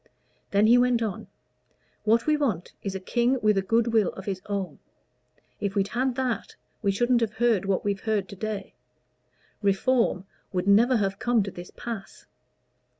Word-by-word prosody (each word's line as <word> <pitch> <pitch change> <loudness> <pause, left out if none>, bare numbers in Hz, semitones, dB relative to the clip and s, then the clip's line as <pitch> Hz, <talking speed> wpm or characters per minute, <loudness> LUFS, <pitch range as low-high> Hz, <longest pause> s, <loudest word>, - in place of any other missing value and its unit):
Then 200 +1 +3
he 240 +3 +6
went 245 -2 +3
on 210 -4 -4 0.8
"What 225 +2 +3
we 305 - +3
want 225 - -1
is 195 -1 -4
a - - -2
king 240 +7 +1
with 210 -1 +4
a 195 - +2
good 230 +4 +1
will 215 -5 +4
of 190 - -9
his 190 -2 -3
own. 200 -2 -3 0.8
If 200 0 -2
we'd 200 -1 +1
had 255 +1 0
that, 255 -3 -2 0.3
we 200 - +1
shouldn't 240 +4 +2
have 220 -2 0
heard 220 -4 +2
what 195 0 0
we've 200 -1 0
heard 215 -2 -1
to 200 - -8
day; 210 -1 -5 0.9
Reform 200 -1 +1 0.3
would 185 -1 -2
never 230 +5 +5
have 195 -2 -1
come 240 -3 +2
to 195 - -5
this 175 0 -9
pass. 225 -5 -7
215 Hz, 175 wpm, -26 LUFS, 195-240 Hz, 0.9 s, he